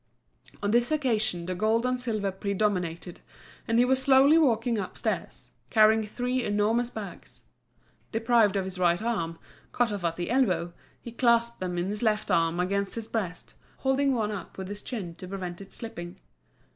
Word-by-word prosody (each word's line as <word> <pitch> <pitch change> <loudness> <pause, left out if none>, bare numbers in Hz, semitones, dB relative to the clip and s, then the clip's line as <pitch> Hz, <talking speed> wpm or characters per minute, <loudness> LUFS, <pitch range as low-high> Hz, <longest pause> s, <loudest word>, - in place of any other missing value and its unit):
On 205 - +1
this 240 +4 +3
occasion 220 - 0
the 185 - -2
gold 220 +5 +1
and 250 0 0
silver 215 -5 -1
predominated, 190 -3 -2 0.5
and 230 - +2
he 245 - +5
was 260 +1 +2
slowly 270 +3 +6
walking 235 -7 +3
upstairs, 190 - -4 0.2
carrying 220 0 +5
three 250 +3 -1
enormous 220 +3 +1
bags. 185 - -9 0.7
Deprived 225 -3 +3
of 195 -1 0
his 190 -1 -6
right 175 -1 +3
arm, 200 -8 -2 0.3
cut 245 -2 +1
off 200 -3 -4
at 165 -1 0
the 175 +5 -3
elbow, 185 -9 +1 0.3
he 235 - -9
clasped 235 0 +2
them 180 -1 -3
in 175 - 0
his 210 +2 -3
left 215 -2 +1
arm 165 +1 +2
against 200 +2 -1
his 230 -1 -4
breast, 195 -6 -4 0.2
holding 265 0 +1
one 215 -3 0
up 205 - -7
with 190 0 -6
his 205 0 -7
chin 195 -9 -5
to 185 - -10
prevent 180 -1 -6
it 195 - -12
slipping. 180 -5 -8
215 Hz, 170 wpm, -27 LUFS, 185-235 Hz, 0.7 s, slowly